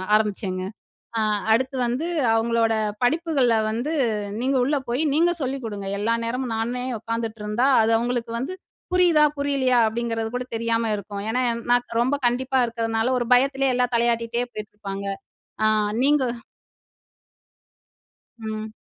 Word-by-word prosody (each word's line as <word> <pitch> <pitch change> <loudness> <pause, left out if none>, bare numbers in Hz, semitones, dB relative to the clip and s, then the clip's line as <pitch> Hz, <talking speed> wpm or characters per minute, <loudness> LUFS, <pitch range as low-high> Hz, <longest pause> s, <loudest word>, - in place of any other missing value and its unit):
ஆரம்பிச்சேங்க. 200 -3 -1 0.6
அ - - +2 0.3
அடுத்து 260 +4 +1
வந்து 255 +8 -1 0.3
அவுங்களோட 225 0 +2 0.3
படிப்புகள்ல 280 -3 +2 0.2
வந்து 240 +8 -2 0.5
நீங்க 265 +2 +1
உள்ள 290 +3 +1
போயி 245 +5 0
நீங்க 335 +3 +4
சொல்லிக்குடுங்க. 230 -7 -4
எல்லா 225 +3 +1
நேரமும் 245 0 -2
நானே 245 +3 -2 0.2
உக்காந்துட்டுருந்தா, 225 +1 -2 0.2
அது 220 - +2
அவுங்களுக்கு 240 -1 -2
வந்து 270 +10 -4 0.4
புரியுதா! 345 -4 +5
புரியலயா! 275 -3 +2
அப்பிடிங்கிறது 225 0 -2
கூட 250 0 -2
தெரியாம 230 0 0
இருக்கும். 200 0 -6
ஏன்னா, 245 +3 0
என் 235 0 -3
நான் 245 0 +4 0.2
ரொம்ப 260 +4 +2
கண்டிப்பா 260 +2 +1
இருக்கிறதுனால, 225 0 -1
ஒரு 240 - -2
பயத்துலே 270 +1 +2
எல்லா 250 0 +2
தலையாட்டிட்டே 235 0 +1
போயிட்டுருப்பாங்க. 205 -2 -7 0.6
அ - - +4 0.4
நீங்க 290 0 +4 2.2
ம். 220 0 -5
235 Hz, 125 wpm, -23 LUFS, 225-260 Hz, 2.2 s, புரியுதா